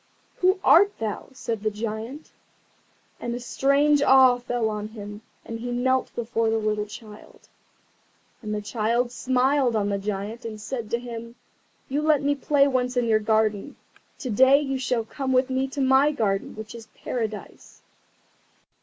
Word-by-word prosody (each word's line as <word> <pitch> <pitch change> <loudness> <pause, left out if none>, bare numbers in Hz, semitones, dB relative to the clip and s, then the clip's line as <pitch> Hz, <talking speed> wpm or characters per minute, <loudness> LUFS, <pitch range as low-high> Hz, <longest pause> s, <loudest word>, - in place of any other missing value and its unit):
"Who 370 +1 +2
art 405 +4 +5
thou?" 220 -2 -4
said 230 -4 -4
the 215 - 0
Giant, 225 +7 -6 0.9
and 240 0 -3
a - - -4
strange 280 +4 +2
awe 260 -3 +6
fell 245 -2 -1
on 210 -1 -3
him, 205 -1 -9 0.2
and 230 0 -6
he 245 +2 -5
knelt 260 +2 +1
before 230 -1 -1
the 225 - +1
little 210 -1 -1
child. 210 0 -13 0.9
And 215 -2 -5
the 210 0 -3
child 230 +3 0
smiled 255 0 +1
on 205 -1 0
the 200 -1 -1
Giant, 210 +3 -4
and 220 -2 -6
said 225 0 -5
to 235 - 0
him, 235 -1 -8 0.5
"You 285 +2 -1
let 305 -2 +2
me 285 +1 +2
play 285 0 +2
once 250 -2 -1
in 245 - +2
your 220 -1 +3
garden, 215 +3 0 0.4
to 255 - -5
day 260 +6 +6
you 270 -2 -2
shall 245 -3 -1
come 265 +3 -3
with 255 +1 +2
me 260 +1 0
to 275 +1 -4
my 265 +2 +4
garden, 205 -8 -1
which 220 0 -8
is 230 -2 -10 0.2
Paradise." 220 -4 -5
240 Hz, 165 wpm, -25 LUFS, 215-265 Hz, 0.9 s, awe